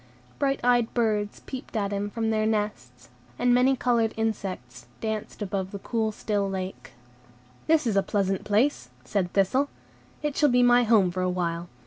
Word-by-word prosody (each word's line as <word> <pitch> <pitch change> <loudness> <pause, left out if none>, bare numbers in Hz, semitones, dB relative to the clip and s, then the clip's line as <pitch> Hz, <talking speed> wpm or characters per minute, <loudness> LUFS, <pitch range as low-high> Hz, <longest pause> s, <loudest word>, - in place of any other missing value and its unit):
Bright 275 -1 +1
eyed 245 -2 +3
birds 210 -3 0
peeped 260 -2 -8
at 200 -1 -1
him 200 +1 -2
from 225 +1 -1
their 215 0 +1
nests, 125 - -3 0.3
and 245 0 +3
many 255 +2 +4
colored 235 -3 +1
insects 185 - -4
danced 220 -1 -4
above 190 -1 -3
the 200 - -6
cool, 220 +2 -1
still 205 -2 -1
lake. 190 0 -6 0.7
"This 315 -3 +3
is 220 -4 0
a 195 - +5
pleasant 195 -1 -1
place," 210 - +1 0.2
said 190 -4 -1
Thistle; 255 +9 +2 0.5
"it 295 -2 -1
shall 295 -2 +4
be 245 0 +4
my 245 0 +5
home 210 -5 +4
for 185 +1 -3
a 185 - +1
while. 175 -1 -2
210 Hz, 170 wpm, -26 LUFS, 190-240 Hz, 0.7 s, a